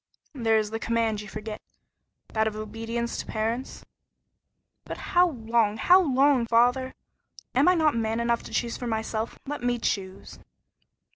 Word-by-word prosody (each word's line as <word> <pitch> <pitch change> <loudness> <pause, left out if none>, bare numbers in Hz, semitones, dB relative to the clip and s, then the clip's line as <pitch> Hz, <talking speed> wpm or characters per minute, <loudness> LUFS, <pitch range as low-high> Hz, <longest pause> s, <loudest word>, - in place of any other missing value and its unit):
"There 225 -5 +2
is 215 -1 -1
the 225 - -3
command 225 -2 0
you 210 - -9
forget; 215 +1 -7 0.7
that 220 0 +1
of 215 - -3
obedience 225 +2 -4
to - - -4
parents." 225 +4 -3 1.0
"But - - -7
how 355 0 +3
long 225 -5 0
how 360 +11 +6
long, 270 -5 +3
father? 245 +3 +2 0.6
Am - - +3
I 365 - +6
not 315 -3 +3
man 225 0 -1
enough 235 0 +1
to - - -9
choose 235 -1 -1
for 245 - -5
myself? 220 0 -3
Let 290 -1 -5
me 245 0 0
choose." 190 -4 -4
230 Hz, 155 wpm, -26 LUFS, 220-250 Hz, 1.0 s, how